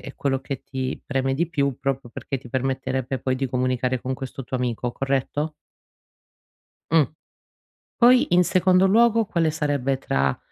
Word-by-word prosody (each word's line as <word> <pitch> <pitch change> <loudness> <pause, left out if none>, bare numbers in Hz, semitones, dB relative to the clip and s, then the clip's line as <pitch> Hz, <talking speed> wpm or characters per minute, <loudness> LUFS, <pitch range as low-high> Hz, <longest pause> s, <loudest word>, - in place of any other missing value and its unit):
è - - -9
quello 135 -1 -1
che 135 -1 -5
ti 130 -1 -4
preme 135 -1 0
di 170 +4 0
più, 140 -5 -1
proprio 135 -2 -2
perché 135 +3 -5
ti 125 -1 -13
permetterebbe 130 0 -2
poi 130 +1 -1
di 135 0 -1
comunicare 125 0 0
con 130 +2 -3
questo 135 0 -7
tuo 130 - -4
amico, 125 -1 -2
corretto? 140 +3 -1 1.4
Mh. 160 -2 +6 1.0
Poi, 245 -5 +5
in 180 0 +6
secondo 185 +1 +4
luogo, 230 +2 +4
quale 165 -5 +1
sarebbe 145 -3 0
tra, 65 - 0
135 Hz, 155 wpm, -24 LUFS, 130-160 Hz, 1.4 s, Mh